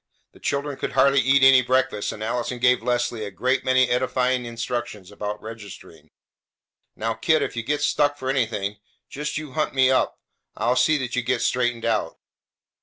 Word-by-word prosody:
The - - -19
children 140 0 -2
could - - -3
hardly 135 +1 +4
eat 135 +1 +3
any 130 -1 +8
breakfast, 125 -4 0
and 110 - -7
Allison 120 +2 -2
gave 125 0 +3
Leslie 120 -1 -1
a 105 - -4
great 130 +6 -1
many 130 0 +3
edifying 125 0 0
instructions 115 -4 -5
about 105 +1 -5
registering. 110 -3 -11 0.9
"Now, 115 +1 -2
kid, 155 +8 +1
if - - -4
you 115 - -2
get 145 +5 -2
stuck 145 -1 +1
for 130 - -6
anything, 110 -6 -1 0.3
just 150 +2 -4
you 155 -3 -6
hunt 155 0 -2
me 130 -1 +4
up. 130 - +1 0.4
I'll 120 +3 +1
see 130 +5 +3
that 130 -3 -4
you 125 - +1
get 120 0 -1
straightened 120 -2 0
out. 110 -7 -1
125 Hz, 180 wpm, -23 LUFS, 115-130 Hz, 0.9 s, any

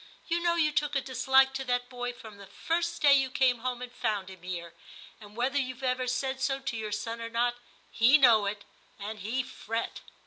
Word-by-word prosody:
You 340 0 +1
know 340 0 +2
you 310 -3 +2
took 295 -1 0
a 275 - +2
dislike 265 +1 +3
to 270 0 -3
that 245 -1 0
boy 245 -1 -4
from 220 -4 -12
the 200 -1 -12
first 335 - -2
day 285 -1 +8
you 270 -1 +3
came 255 -2 +2
home 250 +1 -3
and 250 - -8
found 210 -6 -2
him 185 -2 -13
here; 170 -2 -6 0.5
and 210 -1 -14
whether 260 +4 +1
you've 255 -1 -4
ever 255 0 0
said 265 +1 -2
so 270 0 0
to 265 -3 -4
your 215 -1 -4
son 230 +3 -4
or 230 - -5
not, 240 +1 0 0.3
he 245 +6 +6
know 230 -7 +5
it, 200 0 -4 0.3
and 210 +1 -6
he 230 +7 -2
fret.' 225 -1 -5
245 Hz, 215 wpm, -29 LUFS, 220-265 Hz, 0.5 s, day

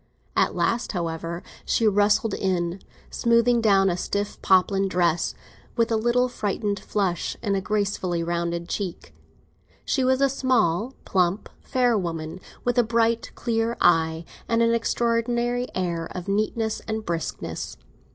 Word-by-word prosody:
At - - +2
last, 235 -1 0
however, 170 -1 -3 0.2
she 225 - +2
rustled 205 +2 +3
in, 180 -1 -1 0.3
smoothing 235 0 +3
down 195 -3 +4
a 180 - +1
stiff 200 +3 -3
poplin 195 +1 +3
dress, 175 -2 +1 0.4
with 230 -1 +1
a - - +3
little 240 +3 +2
frightened 205 -3 -2
flush 190 -5 -1
in 205 -3 +1
a 195 - 0
gracefully 195 -4 -1
rounded 170 0 -2
cheek. 185 -3 -5 0.7
She 265 - +1
was 260 0 +3
a 275 - +5
small, 255 -4 +1
plump, 185 +1 +1
fair 250 -3 +1
woman, 165 -2 -4 0.3
with 245 0 +2
a - - +6
bright, 230 0 +1
clear 230 -1 -1
eye, 160 0 +3 0.2
and 230 0 +3
an 230 0 +3
extraordinary 235 +1 0
air 170 -3 -1
of 180 0 -5
neatness 215 +2 0
and 220 -1 -3
briskness. 170 -1 -4
205 Hz, 140 wpm, -25 LUFS, 175-235 Hz, 0.7 s, a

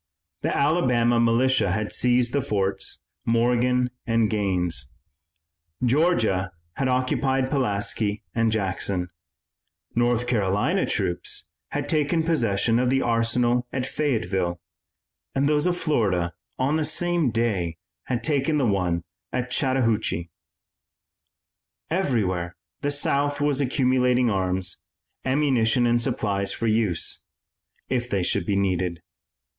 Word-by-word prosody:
The - - -1
Alabama 125 -6 +3
militia 120 0 +3
had 105 0 -2
seized 125 0 +2
the 140 - +2
forts, 100 -7 -2 0.2
Morgan 125 +2 +2 0.2
and 115 -2 +2
Gaines; 90 -9 0 1.0
Georgia 120 - +2 0.3
had 135 - 0
occupied 130 +1 +1
Pulaski 105 -5 -1
and 115 -1 +2
Jackson; 95 -3 -1 0.8
North 120 0 +1
Carolina 105 -4 +1
troops 85 - -2 0.2
had - - -3
taken 155 +2 +1
possession 115 -8 +1
of 125 0 +2
the 135 +1 +2
arsenal 120 +1 +1
at 130 -1 -2
Fayetteville, 95 - -1 0.8
and 140 +1 +2
those 150 +2 +2
of 175 -1 0
Florida 95 - 0 0.2
on 140 +4 +1
the 160 - 0
same 170 0 +1
day 105 -8 -1 0.3
had 125 -2 -2
taken 150 +1 +1
the 140 - +2
one 90 -5 0 0.3
at 125 0 -2
Chattahoochee. 115 - 0 1.6
Everywhere 100 - 0 0.3
the 145 - 0
South 145 0 +1
was 145 -1 +1
accumulating 125 -2 +2
arms, 95 -1 -1 0.5
ammunition 130 -3 +2
and 120 0 +3
supplies 100 -6 -1
for 115 - -3
use 110 -6 0 0.6
if 125 -1 -1
they 100 -5 0
should - - -1
be 100 - +1
needed. 90 -3 -1
120 Hz, 115 wpm, -24 LUFS, 100-130 Hz, 1.6 s, Alabama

